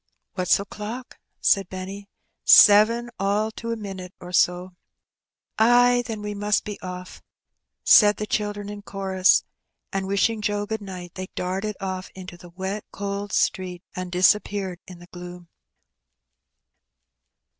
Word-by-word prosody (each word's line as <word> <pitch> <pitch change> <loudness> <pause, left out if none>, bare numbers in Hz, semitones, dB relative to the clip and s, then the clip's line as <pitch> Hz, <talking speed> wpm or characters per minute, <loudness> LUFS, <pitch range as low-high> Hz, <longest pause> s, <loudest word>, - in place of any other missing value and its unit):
'* - - -57
"What's 185 -2 +2
o'clock?" 210 +5 -7 0.2
said 195 -3 +3
Benny. 195 +2 -7 0.3
"Seven, 230 +3 +7
all 205 +3 0
to 230 +1 -6
a - - -1
minit 195 -4 -8
or 180 - -10
so." 180 +1 +1 0.9
"Ay, 245 +2 +5
then 220 -3 -5
we 210 0 -4
must 205 +1 0
be 210 -1 -7
ofiF," 180 0 -8 0.6
said 210 -1 +6
the 210 - -3
children 205 -1 -2
in 205 0 -7
chorus; 195 -1 +2 0.5
and 195 0 -2
wishing 205 +3 +1
Joe 205 0 -1
good 220 0 -4
night, 180 -3 -8
they 185 0 -6
darted 190 +3 -3
off 185 -1 -4
into 185 -1 -9
the 175 0 -14
wet, 190 +4 -5
cold 200 0 -4
street, 180 -1 -1
and 185 -1 -5
disappeared 190 0 +1
in 180 -2 -11
the 175 0 -15
gloom. 175 -1 -10
200 Hz, 140 wpm, -24 LUFS, 185-210 Hz, 0.9 s, Seven